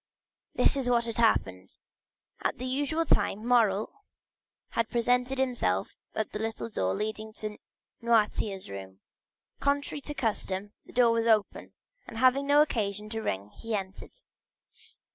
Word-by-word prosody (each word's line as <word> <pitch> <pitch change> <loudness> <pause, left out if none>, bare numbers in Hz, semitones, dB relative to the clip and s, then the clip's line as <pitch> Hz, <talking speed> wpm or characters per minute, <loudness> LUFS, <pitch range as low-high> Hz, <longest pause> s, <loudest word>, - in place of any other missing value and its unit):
This - - +3
is 265 -3 0
what 235 -1 +3
had 230 -1 -4
happened. 95 - +1 0.6
At - - -1
the 255 - -5
usual 290 +5 0
time, 215 -6 +1
Morrel 220 -4 +3 0.8
had 230 -1 -1
presented 250 +2 +1
himself 240 - 0 0.2
at 220 - -2
the 210 - -4
little 225 +1 -3
door 95 - 0
leading 215 +1 -3
to 215 -1 -6 0.4
Noirtier's 215 -4 +1
room. 95 -1 -9 0.6
Contrary 285 +1 0
to 295 +1 -6
custom, 205 -4 -2
the - - -12
door 245 -2 +4
was 230 0 +1
open, 215 -3 +1 0.3
and 225 - -8
having 260 +3 +4
no 290 +1 +7
occasion 210 -6 -2
to 225 0 -3
ring 100 - -3
he 225 - -4
entered. 195 - -6
225 Hz, 145 wpm, -29 LUFS, 205-250 Hz, 0.8 s, no